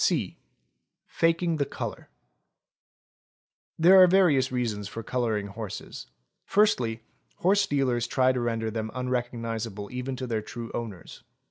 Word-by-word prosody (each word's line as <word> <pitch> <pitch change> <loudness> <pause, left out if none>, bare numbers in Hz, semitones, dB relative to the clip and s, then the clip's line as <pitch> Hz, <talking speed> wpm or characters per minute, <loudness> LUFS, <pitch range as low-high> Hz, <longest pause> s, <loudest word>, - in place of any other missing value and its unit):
(c) - - +1 0.7
Faking 165 0 +1
the 145 - +2
colour. - - -6 1.7
There 185 +3 +7
are 185 - +9
various 170 -9 +4
reasons 115 -5 -2
for 115 +3 -7
colouring 115 -5 -1
horses. 100 0 -7 0.4
Firstly, 125 - +1 0.3
horse 200 +2 +2
dea 145 -5 +1
lers 120 -2 0
try 130 -1 +3
to 130 - -2
render 115 -2 -1
them 110 0 -3
unrecognisable 115 -4 -3
even 125 +1 -4
to 130 +1 -5
their 115 -3 -2
true 115 +2 -7
owners. 105 -8 -7
120 Hz, 130 wpm, -27 LUFS, 115-140 Hz, 1.7 s, are